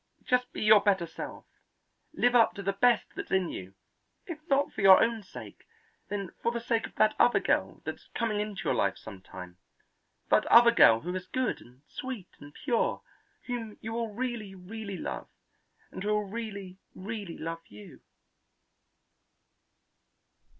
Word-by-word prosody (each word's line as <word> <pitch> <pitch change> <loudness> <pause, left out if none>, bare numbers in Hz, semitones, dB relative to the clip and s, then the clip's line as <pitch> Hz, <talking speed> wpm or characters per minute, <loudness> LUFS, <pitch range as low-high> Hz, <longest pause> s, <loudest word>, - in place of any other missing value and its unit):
Just 250 0 +1
be - - -4
your 215 -1 +7
better 195 -4 +2
self; - - -8 0.7
live 245 -5 +2
up 235 -2 +5
to 200 - -6
the 195 +1 0
best 235 +3 +2
that's - - -6
in 190 -3 +1
you; 95 +1 -8 0.5
if 335 -4 -7
not 280 0 +2
for - - -4
your 190 -1 +9
own 230 -1 +1
sake, 125 - -12 0.4
then 200 -3 -4
for 235 - +1
the 235 - -3
sake 230 -1 -1
of - - -21
that 215 0 +4
other 245 - +5
girl - - -1
that's - - -6
coming 225 -3 0
into 210 -2 -4
your - - +1
life 100 -1 +1
some 100 -4 -11
time; 90 -2 -11 0.7
that - - +5
other 235 0 +8
girl 115 - +6
who 180 - -4
is 185 0 -5
good 255 +3 -1
and 125 +3 -19
sweet 250 -8 -7
and 145 0 -13
pure, 240 -5 -1 0.4
whom 230 -4 -5
you 225 +1 -6
will 230 -1 -2
really, 230 -4 -4
really 200 +1 -7
love - - -5 0.6
and - - -7
who 210 - -1
will 210 0 0
really, 200 -3 -6 0.2
really 200 -3 -6
love 165 0 -5
you." 105 0 -13
210 Hz, 165 wpm, -29 LUFS, 180-235 Hz, 0.7 s, your